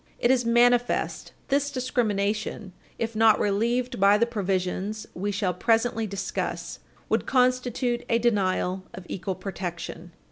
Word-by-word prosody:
It 240 - +3
is 245 -3 +2
manifest 240 +1 +2
that - - -22
this 285 +1 +2
discrimination, 215 -6 -1 0.2
if 230 0 -3
not 220 -1 +5
relieved 235 +4 0
by 200 +1 +6
the 235 - +3
provisions 200 -1 -2
we 200 +3 -3
shall 195 -2 0
presently 225 +3 +1
discuss, 195 -1 -4 0.3
would - - 0
constitute 250 -1 +1
a 230 - +4
denial 190 -5 +1
of 180 - -9
equal 190 0 -4
protection. 175 -2 -6
215 Hz, 135 wpm, -26 LUFS, 195-240 Hz, 0.3 s, by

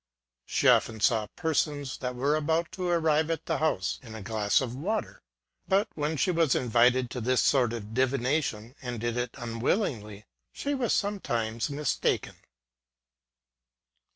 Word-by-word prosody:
She - - +1
often 110 - +4
saw 110 0 +2
persons, 150 -4 -1
that 125 -1 -3
were 140 +4 +1
about 160 +2 0
to 185 -1 -3
arrive 160 -2 +2
at 165 -1 -2
the 160 -4 -1
house, 155 -12 0
in 115 -4 -10
a 110 - -7
glass 105 0 +1
of 125 -2 -3
water; 205 +11 -3 0.5
but 195 +2 +2
when 150 +1 -2
she 185 - +2
was 165 -5 +2
invited 125 +1 +3
to 125 - -4
this 125 +2 +2
sort 125 -5 +3
of 110 -2 -6
divi 130 +2 +2
nation, 125 -4 -1
and 125 -3 -4
did 120 +1 -2
it 120 -1 -3
unwillingly, 115 - -2 0.3
she 285 - -3
was 255 -5 0
sometimes 120 - -1
mistaken. 145 +1 -1
130 Hz, 155 wpm, -28 LUFS, 115-160 Hz, 0.5 s, often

